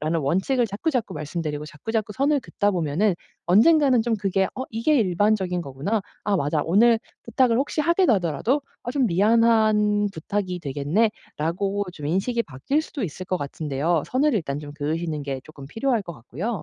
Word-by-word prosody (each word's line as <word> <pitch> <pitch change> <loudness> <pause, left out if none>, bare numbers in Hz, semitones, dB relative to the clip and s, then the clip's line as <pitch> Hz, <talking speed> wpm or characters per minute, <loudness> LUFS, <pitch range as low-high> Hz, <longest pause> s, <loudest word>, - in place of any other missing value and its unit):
라는 160 +2 0
원칙을 190 - +1
자꾸자꾸 225 - -2
말씀드리고 150 -1 -4
자꾸자꾸 210 +8 -3
선을 285 +3 +2
긋다 205 -4 0
보면은 175 +2 +1 0.3
언젠가는 255 - +5
좀 235 0 0
그게 195 -1 +1
'어 260 - -4
이게 230 +7 +2
일반적인 190 -2 +1
거구나. 145 +11 -2 0.2
아 205 -1 +2
맞아.' 145 -1 0
오늘 225 +7 +4 0.3
부탁을 235 0 +2
혹시 285 +3 -1
하게 340 +4 +3
되더라도 215 - +1 0.2
어 240 - -4
'좀 270 -3 +2
미안한 210 +1 +3
부탁이 185 +2 -3
되겠네.'라고 170 +5 -1
좀 150 -4 -7
인식이 205 +9 0
바뀔 150 - -1
수도 295 -4 -6
있을 185 0 -5
것 185 - 0
같은데요. 150 +2 -1
선을 285 +4 +2
일단 150 -9 -2
좀 145 -1 -8
그으시는 155 +1 -2
게 135 -2 -4
쪼끔 145 -3 -12
필요할 225 - 0
것 170 -3 -8
같고요. 165 - -5
195 Hz, 380 characters per minute, -24 LUFS, 155-230 Hz, 0.3 s, 언젠가는